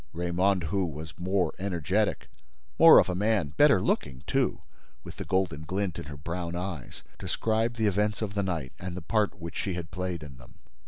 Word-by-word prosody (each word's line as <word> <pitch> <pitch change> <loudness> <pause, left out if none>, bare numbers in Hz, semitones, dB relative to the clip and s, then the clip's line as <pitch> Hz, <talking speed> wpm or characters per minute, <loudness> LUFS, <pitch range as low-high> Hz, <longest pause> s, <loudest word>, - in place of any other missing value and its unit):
Raymonde, 90 +2 +1
who 95 +5 0
was 80 -2 -6
more 95 +1 +1
energetic, 95 +2 0 0.5
more - - +10
of - - +6
a 90 - -1
man, 100 -4 +1
better 140 - +5
looking, 65 -7 -1
too, - - 0 0.4
with - - -10
the - - -5
golden 95 -6 0
glint 95 +2 -2
in - - -7
her 75 0 -8
brown 85 +3 -4
eyes, 90 -6 -5 0.2
described 115 +2 0
the 110 -2 0
events 105 +2 +1
of 100 -2 -3
the 100 - 0
night 80 -9 -3
and 90 0 -5
the 90 - -6
part 105 +2 0
which 85 -1 -7
she 95 -3 -2
had 85 0 -6
played 90 -3 -3
in 70 -4 -10
them. 60 -1 -16
90 Hz, 195 wpm, -28 LUFS, 80-100 Hz, 0.5 s, more